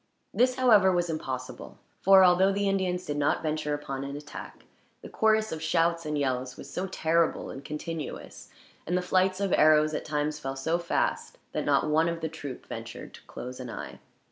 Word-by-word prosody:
This, 250 +1 +3
however, 215 -7 +5
was 175 -2 0
impossible; 130 -5 -6 0.2
for 190 0 +7
although 185 +2 +5
the 200 +1 0
Indians 185 -2 0
did 145 -1 -3
not 145 0 +1
venture 155 -1 -1
upon 140 -2 -5
an 140 0 -5
attack, 150 0 -10 0.4
the - - -8
chorus 220 0 +2
of 160 - -5
shouts 165 0 +1
and 150 0 -1
yells 130 -2 -2
was - - -10
so 185 +2 -2
terrible 165 -2 0
and 135 - -9
continuous, 155 +1 -6 0.4
and 180 +2 +1
the 180 - -1
flights 185 +1 +2
of 200 -2 0
arrows 155 0 +5
at - - -2
times 150 0 -2
fell 135 -2 -4
so 160 +6 -1
fast, 170 - -1
that - - -2
not - - +2
one 160 +2 +3
of 170 0 -4
the 160 - -2
troop 145 -4 -8
ventured - - -8
to - - -13
close 125 +1 -8
an 125 -1 -6
eye. 110 - -7
160 Hz, 195 wpm, -28 LUFS, 145-185 Hz, 0.4 s, for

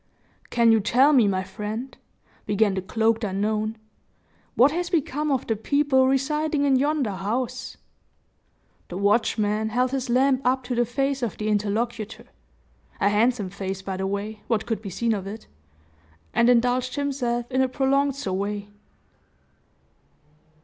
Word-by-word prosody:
"Can 235 -1 +4
you 225 - +5
tell 255 +8 +4
me, 245 -7 +5
my 190 -1 0
friend," 215 +7 -6 0.5
began 205 0 +2
the 190 - -2
cloaked 225 +3 0
unknown, 215 +2 -1 0.8
"what 265 +4 +5
has 350 +2 -2
become 300 -3 0
of 270 -1 0
the 225 - 0
people 265 +3 +2
residing 295 +2 +1
in 275 -2 +4
yonder 280 -3 +1
house?" 235 +7 -3 1.1
The 180 - -5
watchman, 210 +1 +1
held 250 +3 +1
his 265 -2 -2
lamp 260 +2 +3
up 255 +1 +1
to 250 - -4
the 240 0 +2
face 270 +3 -1
of 235 -4 -3
the 215 0 -2
interlocutor 215 +2 -2 0.7
a 200 - +3
handsome 210 -2 +1
face 195 -1 -5
by 190 0 -4
the 190 0 -2
way, 205 +2 -4
what 220 -2 0
could 225 -2 -2
be 205 - -6
seen 225 +5 0
of 195 -2 -4
it 215 +2 -8 0.9
and 235 +1 +4
indulged 245 +1 +2
himself 255 -4 -2
in 260 +1 +2
a 260 - +3
prolonged 275 +1 +1
survey. 205 -3 -3
235 Hz, 150 wpm, -24 LUFS, 210-265 Hz, 1.1 s, you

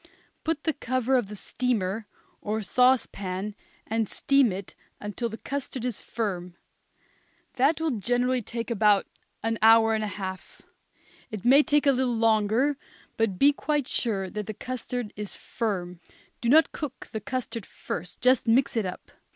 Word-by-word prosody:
Put 320 -2 -1
the 315 - +1
cover 255 -1 0
on 245 -4 +2
the 210 +2 -8
steamer, 215 -2 -2 0.3
or 215 +1 -2
sauce 250 +4 +4
pan, 195 +2 -5 0.3
and 225 -1 -1
steam 275 -5 +3
it 190 +1 -6 0.3
until 210 +3 -3
the 220 - -7
custard 265 -2 -4
is 245 -5 -3
firm. 180 -6 -4 1.0
That 280 +5 +3
will 320 -1 0
generally 245 +3 +1
take 230 +2 -5
about 210 -2 +4 0.4
an 225 0 -1
hour 225 0 +6
and 215 0 0
a - - -1
half. 190 -1 -7 0.7
It 215 -2 -7
may 270 +4 +7
take 295 -1 +2
a 280 - +6
little 255 -3 0
longer, 225 +5 +2 0.4
but 225 -5 0
be 285 +6 +5
quite 290 -2 -1
sure 200 -5 0
that 210 -1 -4
the 215 - -5
custard 245 -2 -4
is 210 -1 -6
firm. 180 -6 -3 0.4
Do 235 - 0
not 315 +5 +6
cook 280 -4 -6
the 220 - -4
custard 255 -5 -4
first, 175 +2 -6
just 255 -1 +4
mix 245 +4 +3
it 220 -4 +1
up. 180 - -8
230 Hz, 160 wpm, -27 LUFS, 210-255 Hz, 1.0 s, may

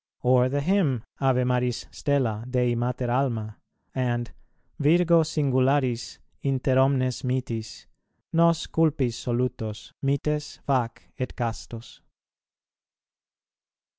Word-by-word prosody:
Or 125 0 +4
the 140 +2 0
Hymn, 150 - +1 0.2
"Ave 130 -2 +3
Maris 125 -1 0
stella, 125 -7 0
Dei 125 -1 +2
Mater 120 +1 -1
alma," 115 -5 -1 0.4
and 120 -2 -1 0.5
"Virgo 170 +3 +5
singularis, 135 -5 +1 0.2
inter 135 -1 +1
omnes 130 -2 +2
mitis, 125 -4 -3 0.5
nos 170 0 +4
culpis 150 -7 +1
solutos, 120 -3 -3
mites 150 +2 -1
fac 125 -4 0 0.2
et 130 - -3
castos." 115 -1 -6
130 Hz, 95 wpm, -26 LUFS, 120-140 Hz, 0.5 s, Virgo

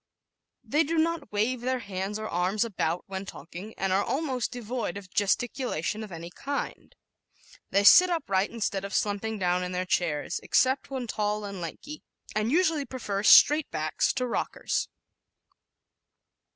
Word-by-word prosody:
They 300 +3 +2
do 325 +2 -2
not 320 -5 0
wave 225 +4 0
their 255 +1 0
hands 200 -2 -4
or 215 0 -4
arms 185 +5 0
about 175 -5 -2
when 190 -2 -5
talking 190 +2 -9
and 195 -1 0
are 195 +2 +3
almost 270 -3 -1
devoid 240 -5 -4
of 190 -2 -11
gesticulation 220 - -1
of 210 - -9
any 170 0 -8
kind. 280 +8 -5 0.7
They 200 +1 +2
sit 365 - +9
upright 200 - 0
instead 200 -4 -2
of 200 - -4
slumping 210 +2 -1
down 180 -1 +1
in 180 0 -4
their 180 +1 -1
chairs, 170 -2 -1
except 260 +1 +2
when 260 -2 -3
tall 210 -1 -2
and 200 -2 -6
lanky, 290 - -7 0.3
and 215 +2 0
usually 320 -2 +2
prefer 230 -7 -4
"straight 300 +8 +7
backs" - - 0
to 255 - -1
rockers. 240 - -2
210 Hz, 150 wpm, -27 LUFS, 190-255 Hz, 0.7 s, sit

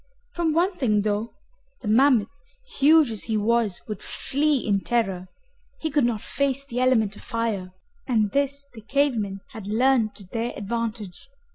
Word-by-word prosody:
From 335 -3 0
one 355 +5 +2
thing, 215 - +1
though, 210 +2 -2 0.5
the - - -5
mammoth, 235 -1 +4 0.5
huge 300 -2 +6
as 215 - -6
he 220 -2 0
was, 220 -2 +1
would 215 - -5
flee 290 +1 0
in 205 -5 0
terror. 195 -7 -1 0.5
He 315 - -2
could 285 -3 +3
not 230 -3 -1
face 275 0 -1
the 245 -3 -4
element 225 -5 +2
of - - -12
fire, 225 -6 -3 0.4
and 215 -5 +2
this 280 +1 0
the 225 - -11
cave 280 +4 +1
men 200 -3 -3
had 220 -6 -8
learned 230 0 +2
to 195 - -5
their 230 +4 -3
advantage. 220 - -4
230 Hz, 165 wpm, -24 LUFS, 210-275 Hz, 0.5 s, huge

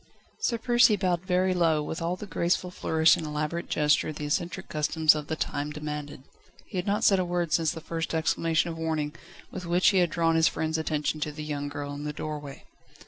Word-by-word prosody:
Sir 235 - 0
Percy 240 -1 +4
bowed 185 -2 -1
very 185 0 +2
low, 165 -4 +2
with 160 +2 -5
all 170 +2 -1
the 195 - -8
graceful 180 -1 0
flourish 160 -2 +3
and - - -5
elaborate 150 +2 -3
gesture 150 0 +2
the 150 -1 -6
eccentric 175 +5 -2
customs 155 +1 +3
of 150 -1 -5
the 160 - -2
time 145 -1 -3
demanded. 150 -2 -6 0.4
He 190 - -4
had 180 - -4
not 205 +1 +1
said 195 -2 +5
a - - +2
word, 175 -2 -1
since 165 -2 +3
the 160 0 -4
first 165 0 -3
exclamation 165 +1 +1
of 165 - -8
warning, 155 -2 -1 0.4
with 180 -2 -6
which 175 +2 +4
he 195 -2 +3
had 175 -1 +3
drawn 165 0 +1
his 165 -1 +5
friend's 160 0 -1
attention 155 -1 -1
to 150 0 -2
the 150 +1 -7
young 145 -1 -3
girl 145 0 -5
in 145 +1 -6
the 150 0 -3
doorway. 150 -2 -6
160 Hz, 215 wpm, -27 LUFS, 150-175 Hz, 0.4 s, said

